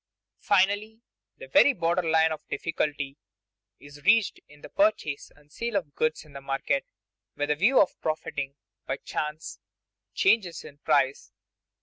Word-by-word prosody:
Finally, 205 +3 +1 0.4
the - - -10
very 285 - +6
border 170 -2 +1
line 160 -1 +3
of 155 - -4
difficulty 145 -4 -2 0.6
is 145 0 -14
reached 215 +1 +3
in 145 0 -18
the - - -10
purchase 295 - 0
and 145 0 -24
sale 235 +4 -4
of 165 -8 -2
goods 155 0 -1
in 150 - -18
the 140 - -8
market 135 - -1 0.5
with 145 +1 -1
a - - +2
view 215 - +4
of 190 - +2
profiting 145 -3 -3 0.3
by - - -2
chance 150 +1 -5 0.6
changes 215 - +2
in 145 - -13
price. 135 -1 +1
160 Hz, 145 wpm, -27 LUFS, 145-205 Hz, 0.6 s, very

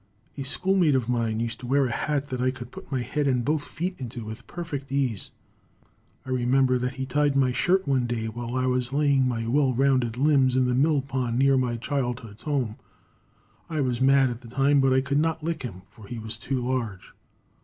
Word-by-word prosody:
A 140 - -5
schoolmate 175 +2 +2
of 125 -3 0
mine 115 -3 0
used 115 0 -3
to 125 - -8
wear 140 +2 +3
a 125 - -2
hat 145 +2 -1
that 130 -1 -3
I 130 - +3
could 125 -1 -7
put - - -11
my 130 -2 0
head 150 +3 -1
and 125 -3 +1
both 150 +1 +1
feet 175 +5 -4
into 120 -3 -6
with 110 +3 -8
perfect 145 -6 -6
ease. 130 -7 -1 1.0
I 130 - -5
remember 130 +1 +2
that 125 +1 -2
he 135 0 -3
tied 145 +2 +1
my 130 -2 +3
shirt 185 +8 +1
one 130 -3 +2
day 115 -2 -2
while 120 +2 -5
I 130 0 +1
was 125 -1 0
laying 140 -2 +3
my 115 -2 -2
well 130 +1 +2
rounded 130 -3 +2
limbs 135 -2 +3
in 130 0 +3
the 125 - +1
mill 140 +2 +3
pond 130 -3 -2
near 135 +1 +4
my 125 -2 0
childhood's 120 -4 -3
home. 135 -8 -1 0.9
I 155 -3 -1
was 125 -2 -1
mad 135 -1 +5
at 120 0 -7
the 120 - -12
time, 135 +3 +3
but 135 0 +3
I 130 0 +4
could 140 +2 0
not 160 0 0
lick 165 +1 -2
him, 95 -8 -7
for 105 -3 -14
he 120 - -6
was 110 0 -5
too 130 0 -2
large. 120 -7 -3
130 Hz, 220 wpm, -26 LUFS, 120-140 Hz, 1.0 s, mad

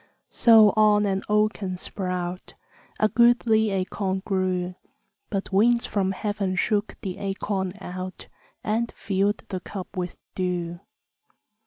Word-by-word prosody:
So 220 -3 +6
on 210 -1 +4
an 195 -1 0
oaken 210 -3 +1
sprout 180 -1 -4 0.4
A 215 - +4
goodly 235 -2 +4
acorn 190 0 -2
grew; 185 -2 -1 0.6
But 200 -1 -3
winds 235 +4 +4
from 195 -2 0
heaven 200 -2 -2
shook 205 +2 0
the 190 -1 -4
acorn 195 -1 -2
out, 185 0 -7 0.4
And 225 +2 0
filled 200 +1 -1
the 185 - -3
cup 190 +1 -8
with 180 -1 -4 0.2
dew. 175 -2 -2
195 Hz, 120 wpm, -25 LUFS, 185-215 Hz, 0.6 s, So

